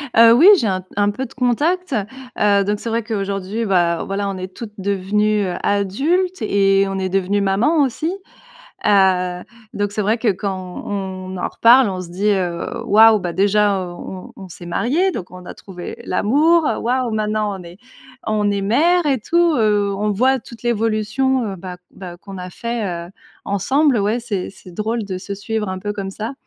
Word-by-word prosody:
Heu, 230 Hz, 0 st, +8 dB
oui, 295 Hz, +10 st, +6 dB
j'ai 235 Hz, -, 0 dB
un 185 Hz, -1 st, -1 dB
un 205 Hz, 0 st, +2 dB
peu 260 Hz, +5 st, -4 dB
de 230 Hz, -, -13 dB
contact. 295 Hz, +7 st, 0 dB, 0.5 s
Heu, 200 Hz, -1 st, +4 dB
donc 205 Hz, +1 st, -1 dB
c'est 230 Hz, -, -5 dB
vrai 230 Hz, +1 st, -1 dB
qu'aujourd'hui, 200 Hz, 0 st, -3 dB
beh, 175 Hz, -4 st, +2 dB
voilà 200 Hz, +1 st, -2 dB
on 195 Hz, -, -4 dB
est 185 Hz, 0 st, -7 dB
toutes 215 Hz, -3 st, -8 dB
devenues, 200 Hz, +2 st, 0 dB
heu, 180 Hz, -, -3 dB
adultes 290 Hz, -, 0 dB
et 195 Hz, 0 st, +3 dB
on 195 Hz, -, -3 dB
est 190 Hz, -, -2 dB
devenues 195 Hz, +2 st, 0 dB
mamans 210 Hz, +12 st, +2 dB
aussi. 310 Hz, +6 st, -2 dB, 0.8 s
Heu, 185 Hz, -3 st, +3 dB, 0.3 s
donc 205 Hz, 0 st, -2 dB
c'est 210 Hz, -, -1 dB
vrai 215 Hz, +4 st, +1 dB
que 225 Hz, -, 0 dB
quand 190 Hz, -2 st, -3 dB
on 190 Hz, -2 st, -5 dB
en -, -, -2 dB
reparle 240 Hz, +1 st, +5 dB
on 185 Hz, -1 st, -4 dB
se 175 Hz, -, -10 dB
dit: 195 Hz, +4 st, -1 dB
«Heu, 180 Hz, -4 st, -1 dB, 0.2 s
waouh, 220 Hz, +1 st, +6 dB
beh, 180 Hz, -3 st, -4 dB
déjà, 200 Hz, +1 st, +2 dB
heu, 180 Hz, -, -6 dB
on 185 Hz, +1 st, -9 dB
on 190 Hz, -2 st, -10 dB
s'est 175 Hz, +1 st, -11 dB
mariées 300 Hz, -, +1 dB
donc 185 Hz, -, -6 dB
on 180 Hz, 0 st, -11 dB
a -, -, -8 dB
trouvé 180 Hz, -3 st, -9 dB
l'amour 300 Hz, -, +3 dB, 0.2 s
waouh 250 Hz, 0 st, 0 dB
maintenant 215 Hz, -2 st, -1 dB
on 180 Hz, -, -10 dB
est, 170 Hz, +2 st, -12 dB, 0.5 s
on 210 Hz, -1 st, +1 dB
est 200 Hz, 0 st, -1 dB
mère 330 Hz, -, +2 dB
et 275 Hz, -3 st, +2 dB
tout, 340 Hz, +6 st, +2 dB
heu». 205 Hz, -3 st, +2 dB
On 210 Hz, 0 st, 0 dB
voit 260 Hz, +6 st, +2 dB
toute 235 Hz, -1 st, -13 dB
l'évolution, 230 Hz, +3 st, 0 dB
heu, -, -, -7 dB
bah 180 Hz, 0 st, -8 dB
bah, 180 Hz, -2 st, -9 dB
qu'on 195 Hz, +1 st, -10 dB
a 180 Hz, 0 st, -7 dB
fait, 200 Hz, -6 st, -4 dB
heu, -, -, -15 dB, 0.3 s
ensemble. 260 Hz, -, +2 dB
Ouais 210 Hz, +4 st, 0 dB
c'est 210 Hz, -6 st, -4 dB
c'est 185 Hz, -2 st, -15 dB
drôle 220 Hz, +4 st, -2 dB
de 190 Hz, -2 st, -5 dB
se 200 Hz, +2 st, -6 dB
suivre 215 Hz, +1 st, -3 dB
un 185 Hz, 0 st, -4 dB
peu 205 Hz, +2 st, -4 dB
comme 195 Hz, -2 st, -5 dB
ça. 220 Hz, +5 st, -5 dB
205 Hz, 195 wpm, -19 LUFS, 190-230 Hz, 0.8 s, Heu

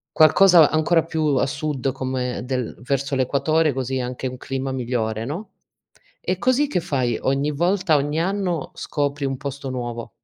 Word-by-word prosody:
Qualcosa 165 Hz, +1 st, +7 dB
ancora 160 Hz, +1 st, +2 dB
più 160 Hz, -1 st, -2 dB
a -, -, +2 dB
sud, 140 Hz, -2 st, -2 dB
come 130 Hz, -2 st, -3 dB
del 125 Hz, -2 st, -3 dB
verso 140 Hz, +1 st, -1 dB
l'equatore, 145 Hz, +4 st, +2 dB
così 130 Hz, 0 st, -2 dB
é -, -, -1 dB
anche 125 Hz, +1 st, -4 dB
un 125 Hz, 0 st, -6 dB
clima 135 Hz, 0 st, -4 dB
migliore, 115 Hz, -3 st, -2 dB
no, 165 Hz, -, -5 dB, 0.7 s
e 185 Hz, -, -2 dB
così 255 Hz, +6 st, +2 dB
che 285 Hz, -, 0 dB
fai, 130 Hz, -8 st, -1 dB
ogni 140 Hz, +2 st, 0 dB
volta, 175 Hz, +2 st, +2 dB
ogni 145 Hz, +3 st, 0 dB
anno 180 Hz, -4 st, -1 dB
scopri 145 Hz, -1 st, -2 dB
un 135 Hz, -1 st, -1 dB
posto 140 Hz, 0 st, -6 dB
nuovo. 120 Hz, -2 st, -5 dB
140 Hz, 165 wpm, -22 LUFS, 130-160 Hz, 0.7 s, Qualcosa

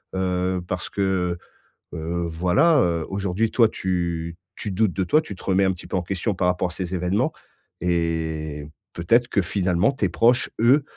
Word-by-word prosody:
heu, 90 Hz, -1 st, 0 dB
parce 90 Hz, -2 st, -3 dB
que, 95 Hz, -3 st, 0 dB, 0.6 s
heu, 85 Hz, +2 st, -3 dB
voilà, 90 Hz, -, +3 dB
heu, 85 Hz, -4 st, 0 dB
aujourd'hui 100 Hz, +3 st, -1 dB
toi 115 Hz, -2 st, +5 dB
tu 85 Hz, -3 st, -2 dB, 0.2 s
tu 105 Hz, -, -5 dB
doutes 105 Hz, +1 st, +2 dB
de 95 Hz, -, -1 dB
toi, 155 Hz, -, +4 dB
tu 100 Hz, -10 st, -8 dB
te -, -, -13 dB
remets 95 Hz, 0 st, +3 dB
un 95 Hz, -, +3 dB
petit 90 Hz, -, -8 dB
peu -, -, -4 dB
en -, -, 0 dB
question 95 Hz, +4 st, -2 dB
par 90 Hz, -, +1 dB
rapport 90 Hz, 0 st, 0 dB
à -, -, -9 dB
ces 90 Hz, 0 st, -4 dB
événements 90 Hz, +3 st, 0 dB, 0.5 s
et 80 Hz, -3 st, -1 dB, 0.3 s
peut-être 115 Hz, +9 st, +2 dB
que 100 Hz, -, +2 dB
finalement 90 Hz, +4 st, +1 dB
tes 100 Hz, -9 st, 0 dB
proches, 120 Hz, +7 st, +3 dB
eux, 135 Hz, +5 st, +5 dB
90 Hz, 180 wpm, -23 LUFS, 85-100 Hz, 0.6 s, toi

